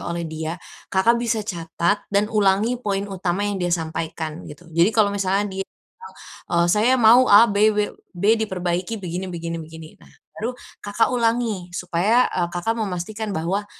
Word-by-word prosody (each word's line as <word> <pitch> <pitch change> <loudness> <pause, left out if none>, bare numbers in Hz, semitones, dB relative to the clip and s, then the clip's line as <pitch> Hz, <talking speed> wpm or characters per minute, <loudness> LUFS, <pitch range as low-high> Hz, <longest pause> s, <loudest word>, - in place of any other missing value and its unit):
oleh 170 0 -3
dia, 160 +1 -5 0.3
Kakak 230 +5 +2
bisa 230 -2 0
catat, 170 0 -1
dan 200 +1 +2
ulangi 210 +4 +2
poin 200 -3 -2
utama 190 0 -2
yang 205 -2 -2
dia 175 - 0
sampaikan 160 0 -4 0.2
gitu. 150 +4 -12
Jadi 170 +4 +4
kalau 205 -2 +4
misalnya 195 0 0 0.2
dia - - -2
bilang, 455 -1 -17 0.4
eee, 170 0 +2
saya 220 +4 +3
mau 245 +2 +6
A-B-B-B 205 -3 +3 0.3
diperbaiki 180 +3 -2
begini 185 -1 -5
begini 170 -1 -5
begini. 160 0 -10
Nah, - - -18 0.3
baru 245 +3 -3 0.2
Kakak 205 +3 +1
ulangi, 230 -6 0
supaya, 185 +8 +2
eee, 175 -2 0
Kakak 175 +6 0
memastikan 210 +2 -4
bahwa, 190 +6 -2
195 Hz, 150 wpm, -22 LUFS, 175-215 Hz, 0.4 s, mau